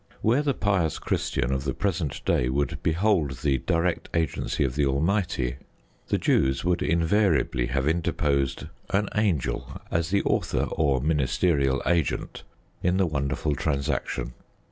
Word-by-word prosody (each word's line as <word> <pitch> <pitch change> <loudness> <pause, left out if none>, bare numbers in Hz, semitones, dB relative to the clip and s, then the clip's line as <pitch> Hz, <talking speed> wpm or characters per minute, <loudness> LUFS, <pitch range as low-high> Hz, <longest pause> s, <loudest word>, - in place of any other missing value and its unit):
Where 120 +6 +3
the 140 -3 0
pious 95 -6 +1
Christian 60 +2 -1
of 65 0 -1
the 70 -2 -2
present 90 -7 -2
day 60 - +2
would 70 +2 -1
behold 80 -5 +1
the 70 -3 +2
direct 85 +5 0
Agency 80 -2 0
of 65 -2 -1
the 75 +2 +1
Almighty, 70 - 0 0.5
the - - +1
Jews 65 +3 +1
would 90 -1 +1
invariably 85 - +2
have 65 +2 -1
interposed 75 -5 0 0.2
an 100 +1 +1
angel 90 - -1
as 80 0 0
the 100 +1 +2
author - - 0
or 70 -5 +1
ministerial 70 -1 +1
agent 85 -4 0 0.4
in 90 +1 +1
the 95 - +3
wonderful 70 -1 -1
transaction. 70 -4 -2
75 Hz, 140 wpm, -26 LUFS, 70-90 Hz, 0.5 s, Where